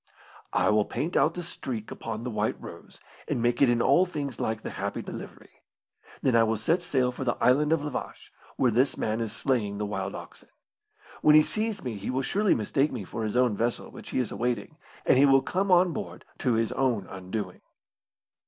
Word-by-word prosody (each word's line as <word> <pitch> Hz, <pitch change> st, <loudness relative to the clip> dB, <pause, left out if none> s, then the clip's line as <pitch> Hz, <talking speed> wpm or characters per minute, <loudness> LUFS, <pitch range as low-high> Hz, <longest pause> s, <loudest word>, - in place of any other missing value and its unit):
"I -, -, +2 dB
will 105 Hz, -1 st, +3 dB
paint 165 Hz, +5 st, -3 dB
out 155 Hz, +4 st, +3 dB
the 175 Hz, -, -4 dB
streak 125 Hz, -9 st, -5 dB
upon 115 Hz, 0 st, -5 dB
the 125 Hz, -, -3 dB
White 105 Hz, 0 st, -1 dB
Rose, -, -, -11 dB, 0.3 s
and -, -, -1 dB
make 120 Hz, +1 st, +1 dB
it 135 Hz, -, +6 dB
in 120 Hz, -1 st, +2 dB
all 140 Hz, +7 st, +5 dB
things 140 Hz, -7 st, -5 dB
like 110 Hz, 0 st, -2 dB
the -, -, -5 dB
Happy -, -, -4 dB
Delivery. -, -, -10 dB, 0.6 s
Then 130 Hz, -3 st, +3 dB
I 115 Hz, -, +6 dB
will 110 Hz, 0 st, +2 dB
set 165 Hz, -, +1 dB
sail 130 Hz, -8 st, +1 dB
for 125 Hz, -, -5 dB
the 120 Hz, -2 st, 0 dB
Island 130 Hz, +6 st, +3 dB
of 165 Hz, -3 st, +2 dB
La 150 Hz, -, -3 dB
Vache, -, -, -6 dB, 0.2 s
where 125 Hz, -, +2 dB
this 125 Hz, +5 st, +2 dB
man 110 Hz, +1 st, -1 dB
is 115 Hz, -2 st, -3 dB
slaying 110 Hz, -3 st, -1 dB
the 105 Hz, -, -2 dB
wild 95 Hz, -1 st, -3 dB
oxen. -, -, -11 dB, 0.7 s
When 150 Hz, 0 st, +6 dB
he 155 Hz, -, +8 dB
sees 215 Hz, +3 st, -2 dB
me 120 Hz, -5 st, -4 dB
he 100 Hz, -, -5 dB
will 130 Hz, +1 st, 0 dB
surely 200 Hz, +8 st, +2 dB
mistake 135 Hz, +6 st, +1 dB
me 120 Hz, -6 st, -4 dB
for 110 Hz, +4 st, -5 dB
his 110 Hz, +1 st, -2 dB
own 125 Hz, -4 st, +3 dB
vessel 115 Hz, +3 st, -2 dB
which -, -, -10 dB
he -, -, -3 dB
is 125 Hz, -4 st, 0 dB
awaiting, 120 Hz, -3 st, -2 dB, 0.3 s
and -, -, +5 dB
he 140 Hz, -, +7 dB
will 135 Hz, -1 st, +5 dB
come 190 Hz, +7 st, -1 dB
on 180 Hz, -1 st, +5 dB
board -, -, -6 dB
to 125 Hz, -, +1 dB
his 115 Hz, 0 st, +1 dB
own 120 Hz, -7 st, 0 dB
undoing." 95 Hz, +1 st, -6 dB
125 Hz, 215 wpm, -27 LUFS, 110-145 Hz, 0.7 s, he